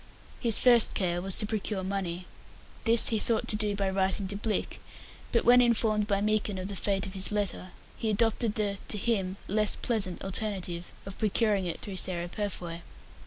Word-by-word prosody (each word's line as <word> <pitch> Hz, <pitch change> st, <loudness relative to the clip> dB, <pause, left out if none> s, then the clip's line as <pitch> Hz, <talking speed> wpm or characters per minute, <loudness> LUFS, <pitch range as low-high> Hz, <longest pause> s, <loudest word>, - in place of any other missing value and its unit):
His 230 Hz, -3 st, +4 dB
first 240 Hz, -3 st, +5 dB
care 175 Hz, -2 st, 0 dB
was 190 Hz, 0 st, -2 dB
to -, -, +2 dB
procure 210 Hz, -2 st, -2 dB
money. 185 Hz, -2 st, -3 dB, 0.6 s
This 230 Hz, 0 st, +5 dB
he 220 Hz, -, 0 dB
thought 225 Hz, +1 st, +2 dB
to -, -, +3 dB
do 210 Hz, -1 st, 0 dB
by 200 Hz, -1 st, -1 dB
writing 190 Hz, +1 st, 0 dB
to 200 Hz, -, -3 dB
Blick, 215 Hz, +1 st, -3 dB, 0.5 s
but 235 Hz, -, +1 dB
when 245 Hz, +1 st, +7 dB
informed 220 Hz, -3 st, +2 dB
by 200 Hz, -1 st, 0 dB
Meekin 210 Hz, -1 st, 0 dB
of 185 Hz, +1 st, -5 dB
the 200 Hz, -, -5 dB
fate 195 Hz, 0 st, 0 dB
of 190 Hz, -, -7 dB
his 195 Hz, +1 st, 0 dB
letter, 205 Hz, -3 st, -1 dB, 0.3 s
he 225 Hz, -, -2 dB
adopted 225 Hz, +1 st, +1 dB
the 200 Hz, -2 st, -1 dB
to 210 Hz, -, 0 dB
him 195 Hz, -3 st, -1 dB
less 210 Hz, +1 st, +2 dB
pleasant 210 Hz, -7 st, -2 dB
alternative 190 Hz, -3 st, -2 dB
of 195 Hz, 0 st, -9 dB
procuring 210 Hz, -3 st, +1 dB
it 170 Hz, -, -4 dB
through 195 Hz, -2 st, -5 dB
Sarah 175 Hz, -2 st, -1 dB
Purfoy. 175 Hz, -4 st, -5 dB
205 Hz, 185 wpm, -28 LUFS, 190-215 Hz, 0.6 s, when